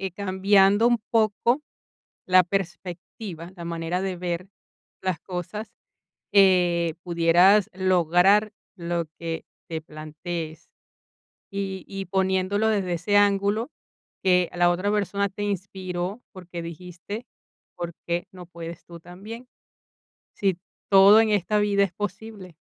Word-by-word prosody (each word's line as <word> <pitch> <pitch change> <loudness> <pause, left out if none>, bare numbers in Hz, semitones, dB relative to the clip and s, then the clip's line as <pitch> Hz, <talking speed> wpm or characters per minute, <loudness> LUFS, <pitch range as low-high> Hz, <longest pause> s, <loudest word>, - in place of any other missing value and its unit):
cambiando 200 +2 +4
un 240 - +3
poco 230 +4 +2 0.6
la 185 0 +6
perspectiva, 180 -1 -5
la 170 - -7
manera 170 +2 -2
de 190 -1 -2
ver 175 +1 -4 0.5
las 185 -4 -1
cosas, 200 +5 -6 0.6
eh, 175 -4 +4
pudieras 175 +3 +4
lograr 185 +3 +3 0.2
lo 170 -1 -2
que 165 -1 -4 0.2
te 160 -1 -3
plantees 155 +1 -7 0.8
y 195 -1 -4
y 195 0 -5
poniéndolo 190 +3 +1
desde 200 -5 0
ese 180 +5 +1
ángulo 205 +4 +2 0.5
que 180 -2 +3
la 175 0 +4
otra 185 +4 0
persona 200 -1 0
te 205 +1 -6
inspiró, 190 0 -4
porque 180 -3 -8
dijiste, 180 +6 -8 0.5
¿por 170 0 -5
qué 175 +2 -1
no 180 -1 -11
puedes 170 -1 -9
tú 170 -1 -11
también? 205 +9 -10 0.9
Si 195 -4 0 0.3
todo 200 +2 +8
en 225 -1 +2
esta 210 +1 +1
vida 200 -1 +3
es 190 - -4
posible. 205 -2 -7
185 Hz, 120 wpm, -25 LUFS, 175-200 Hz, 0.9 s, todo